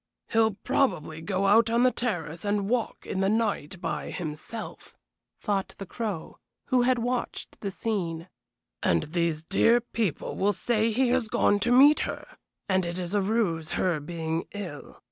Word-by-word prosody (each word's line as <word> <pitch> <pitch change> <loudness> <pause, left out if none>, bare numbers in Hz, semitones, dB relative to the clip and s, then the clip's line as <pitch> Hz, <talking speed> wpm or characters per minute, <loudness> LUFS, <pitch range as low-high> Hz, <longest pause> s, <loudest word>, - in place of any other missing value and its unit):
"He'll 220 -3 +3
probably 160 - 0
go 190 +3 -1
out 220 +3 +5
on 235 +2 +3
the 255 - +5
terrace 175 -11 -3
and 205 -1 0
walk 235 0 -1
in 190 - -3
the 195 0 +2
night 210 -6 -1
by - - -3
himself," 170 +7 -7 0.4
thought 200 -3 -2
the 195 - -6
Crow, 205 -5 -5 0.3
who 255 -1 +4
had 250 +1 +3
watched 245 +1 -3
the 200 - -2
scene, 180 -5 -3 0.5
"and 85 - +2
these 165 -1 -1
dear 225 +7 +4
people 230 -7 -3
will 205 +1 +2
say 220 +3 +1
he 245 +3 +2
has 250 -2 +1
gone 205 -1 +2
to 240 +4 +1
meet 280 +4 +7
her, - - -3 0.4
and 190 -1 +2
it 170 0 -3
is 180 0 -3
a 205 - +3
ruse 190 -6 0
her 175 -4 +1
being 160 +1 -3
ill. 175 -8 -7
200 Hz, 165 wpm, -27 LUFS, 170-230 Hz, 0.5 s, meet